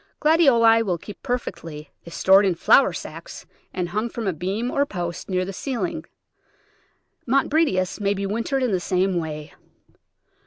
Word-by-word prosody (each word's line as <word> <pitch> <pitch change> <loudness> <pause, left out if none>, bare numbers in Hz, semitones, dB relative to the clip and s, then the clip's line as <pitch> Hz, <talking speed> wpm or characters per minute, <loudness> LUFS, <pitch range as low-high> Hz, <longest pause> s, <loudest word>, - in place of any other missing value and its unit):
Gladioli 250 -8 +5
will 185 -6 -1
keep 200 +4 -11
perfectly 170 -10 -5
if 170 - -10
stored 190 +3 +5
in 190 -3 +1
flour 270 - +5
sacks - - -9 0.3
and 180 -2 -3
hung 215 +4 -2
from 230 -1 -5
a 190 - 0
beam 195 +9 -3
or 280 - +2
post 175 -10 -5
near 185 -1 0
the 195 - -6
ceiling. 315 - -3 1.2
Montbretias 270 - +1
may 200 0 0
be 200 0 -3
wintered 230 +6 -1
in 250 - +1
the 185 - +1
same 185 +1 0
way. 155 -2 -6
200 Hz, 155 wpm, -23 LUFS, 180-245 Hz, 1.2 s, Gladioli